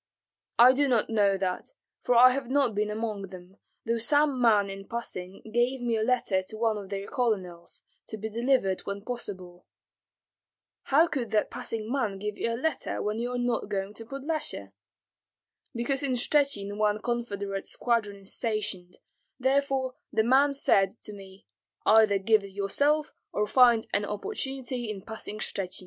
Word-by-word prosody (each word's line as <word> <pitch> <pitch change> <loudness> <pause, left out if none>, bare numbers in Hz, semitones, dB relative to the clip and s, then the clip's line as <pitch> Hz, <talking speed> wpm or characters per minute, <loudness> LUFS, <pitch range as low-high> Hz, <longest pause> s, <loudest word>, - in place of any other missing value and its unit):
"I 245 +2 +8
do 285 +2 +2
not 235 -4 +1
know 200 -3 +3
that, 185 - -3 0.3
for 245 - +1
I 250 +2 +8
have 260 -1 -3
not 270 -4 +2
been 210 +1 0
among 210 -2 -3
them, 185 +1 -13 0.3
though 230 0 0
some 290 +1 +2
man 210 -4 +4
in 195 0 -8
passing 195 -5 -6
gave 245 +2 +1
me 240 -2 0
a 220 - 0
letter 220 -5 +1
to 200 +3 -9
one 225 -1 +1
of 195 -2 -10
their 200 0 -4
colonels, 190 -9 -3 0.2
to 220 - -6
be 215 +1 -4
delivered 230 -4 +1
when 200 0 -4
possible." 185 -7 -7 1.2
"How 300 +5 +5
could 260 -8 -3
that 215 0 +1
passing 225 -2 -5
man 225 -8 -1
give 210 +1 -4
you 230 - -2
a 230 - -2
letter 320 +6 -2
when 210 +2 -2
you 240 +1 -2
are - - -1
not 245 -3 -1
going 195 0 -3
to 225 +2 -9
Podlyasye?" 275 - -3 1.0
"Because 250 +4 0
in 275 -3 0
Shchuchyn 245 -6 +1
one 210 0 +1
confederate 205 -4 -3
squadron 230 -4 0
is 195 0 -9
stationed, 210 -6 -3 0.4
therefore 265 0 +1 0.2
the 220 - +2
man 275 +4 +4
said 195 -8 +3
to 210 - -7
me, 195 -1 -13 0.4
'Either 215 -2 +5
give 215 +1 +3
it 195 -1 -10
yourself 285 +10 +1 0.2
or 210 - +1
find 235 0 +5
an 205 0 +1
opportunity 255 - -3
in 200 -3 -6
passing 220 -1 -6
Shchuchyn.'" 195 -3 -2
220 Hz, 165 wpm, -28 LUFS, 200-250 Hz, 1.2 s, I